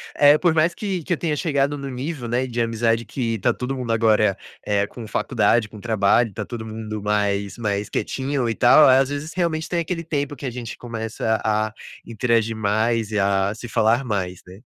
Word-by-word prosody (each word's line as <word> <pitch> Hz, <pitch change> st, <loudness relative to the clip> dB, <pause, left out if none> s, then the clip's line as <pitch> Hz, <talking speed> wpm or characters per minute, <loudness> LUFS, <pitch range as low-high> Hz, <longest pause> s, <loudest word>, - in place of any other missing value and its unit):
eh, 145 Hz, +1 st, +6 dB
por 175 Hz, -1 st, +2 dB
mais 160 Hz, +2 st, +2 dB
que 190 Hz, -5 st, -3 dB
que 175 Hz, -, -1 dB
eu -, -, -1 dB
tenha 155 Hz, -2 st, -1 dB
chegado 145 Hz, -2 st, 0 dB
no 140 Hz, -1 st, -6 dB
nível, 130 Hz, 0 st, -5 dB
né, 120 Hz, +3 st, 0 dB
de 120 Hz, -1 st, -2 dB
amizade 115 Hz, 0 st, +1 dB
que 115 Hz, -4 st, -2 dB
tá -, -, +2 dB
todo 125 Hz, +2 st, -4 dB
mundo 125 Hz, -3 st, -3 dB
agora, 110 Hz, -3 st, +3 dB, 0.3 s
eh, 100 Hz, -1 st, +1 dB
com 120 Hz, -, -9 dB
faculdade, 110 Hz, +1 st, +1 dB
com 105 Hz, 0 st, -12 dB
trabalho, 110 Hz, +1 st, +2 dB
tá -, -, -4 dB
todo 115 Hz, -2 st, -6 dB
mundo 110 Hz, -1 st, -6 dB
mais 100 Hz, 0 st, 0 dB
mais 105 Hz, -3 st, -2 dB
quietinho 135 Hz, -1 st, -2 dB
e 115 Hz, -, -1 dB
tal. 125 Hz, +5 st, +7 dB
Às 130 Hz, +1 st, +5 dB
vezes 145 Hz, +2 st, -5 dB
realmente 160 Hz, -3 st, -1 dB
tem 175 Hz, -, -1 dB
aquele 165 Hz, 0 st, -3 dB
tempo 145 Hz, -3 st, -2 dB
que 140 Hz, -, -8 dB
a -, -, -1 dB
gente 120 Hz, -1 st, -7 dB
começa 110 Hz, -1 st, -3 dB
a 110 Hz, 0 st, 0 dB, 0.3 s
interagir 115 Hz, 0 st, 0 dB
mais 110 Hz, +1 st, 0 dB
e 105 Hz, -, 0 dB
a 100 Hz, 0 st, +1 dB
se 120 Hz, +2 st, -8 dB
falar 115 Hz, +3 st, +2 dB
mais, 95 Hz, -6 st, -3 dB
né. 95 Hz, +2 st, -12 dB
115 Hz, 205 wpm, -22 LUFS, 110-140 Hz, 0.3 s, tal